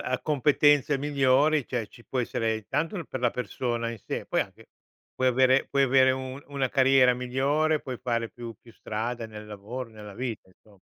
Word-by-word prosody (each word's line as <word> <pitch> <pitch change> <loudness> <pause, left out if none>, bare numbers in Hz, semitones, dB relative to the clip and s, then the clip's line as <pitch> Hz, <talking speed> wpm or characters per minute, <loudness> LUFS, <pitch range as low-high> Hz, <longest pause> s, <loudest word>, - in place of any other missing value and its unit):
a 130 0 -2
competenze 145 -1 +3
migliori, 140 +1 +2
cioè 120 -4 -2
ci 120 +3 -17
può 130 - -2
essere, 115 -2 -1
intanto 160 - -2
per 130 - -6
la 120 -1 +2
persona 120 0 -2
in 115 - -5
sé 105 - -5
poi - - +1
anche - - -7 0.5
puoi 130 0 +2
avere 130 +1 +4
puoi 140 -1 +2
avere 130 0 +5
un 130 +1 -4
una 140 -2 -1
carriera 130 -1 +5
migliore, 140 +5 +1
puoi 130 -2 -6
fare 115 -2 -2
più 120 -1 -9
più 120 - -17
strada 115 +2 -4
nel 105 -1 -9
lavoro, 105 +5 -7
nella 105 -2 -11
vita 115 -1 -5
inso 100 +2 -24
125 Hz, 180 wpm, -27 LUFS, 115-135 Hz, 0.5 s, avere